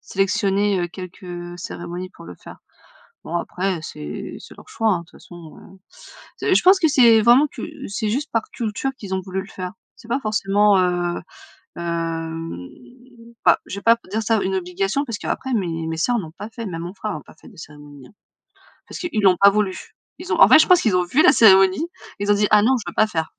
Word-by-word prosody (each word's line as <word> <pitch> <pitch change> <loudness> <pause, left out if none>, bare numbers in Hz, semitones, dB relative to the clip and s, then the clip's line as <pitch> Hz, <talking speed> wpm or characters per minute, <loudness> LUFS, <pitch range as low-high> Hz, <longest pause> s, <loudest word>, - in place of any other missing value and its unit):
sélectionner, 195 0 0
heu, 175 - -2
quelques, 175 -1 -9
cérémonies 175 +1 -7
pour - - -15
le 90 +1 -10
faire. - - -13 0.6
Bon 170 - -4
après, 185 +1 -2
c'est 75 - -7
c'est - - -14
leur - - -16
choix 225 - -1
hein, 180 - 0
de - - -12
toute 165 - -24
façon, 170 -3 -13
heu. 195 - -16 0.6
C'est - - +1
je - - +3
pense 375 +1 +6
que 320 - +4
c'est 235 -6 +6
vraiment 240 +6 +6
que - - -10 0.3
c'est 210 +2 -3
juste 280 +7 -2
par 225 - +1
culture 230 +3 -3
qu'ils 195 -5 -6
ont 190 - -1
voulu 190 0 -4
le - - -13
faire. 185 -3 -7 0.2
C'est 225 - -16
pas 255 +4 -1
forcément, 205 -2 +2
heu, 175 -1 0 0.6
hem, 165 - -4 0.8
bah, - - +5
je 200 - -6
vais 200 - -7
pas 230 +2 +5
p 235 - -23
dire 220 +2 -1
ça 220 0 +1
une 190 - -1
obligation 195 +8 -2
parce 230 -6 -5
qu'après 265 -1 -3
mes 165 -6 -2
mes 160 0 -3
sœurs 240 +9 +1
n'ont 160 -7 -7
pas 210 +5 -9
fait, 230 0 -7
même 165 -4 -5
mon 175 +2 -7
frère 210 +1 -5
a 155 - -7
pas - - -18
fait 155 - -17
de - - -18
cérémonie, 145 -3 -13
hein. - - -21 0.8
Parce - - -8
qu'ils 330 -12 -2
l'ont 190 -3 +4
pas 200 - +8
voulu. 200 -2 -1 0.4
Ils - - -7
ont - - -1
en - - +9
fait - - +8
je - - +4
pense 365 -2 +5
qu'ils 215 -5 +1
ont 180 - +2
vu 250 +13 +2
la - - +7
cérémonie, 195 - +5 0.3
ils 205 +1 +1
ont - - +4
dit: 205 0 +2
«Ah 210 -1 +6
non, 260 +4 +3
je 225 - -6
veux - - -11
pas 215 - +3
faire». 160 -6 -4
195 Hz, 230 wpm, -21 LUFS, 175-220 Hz, 0.8 s, en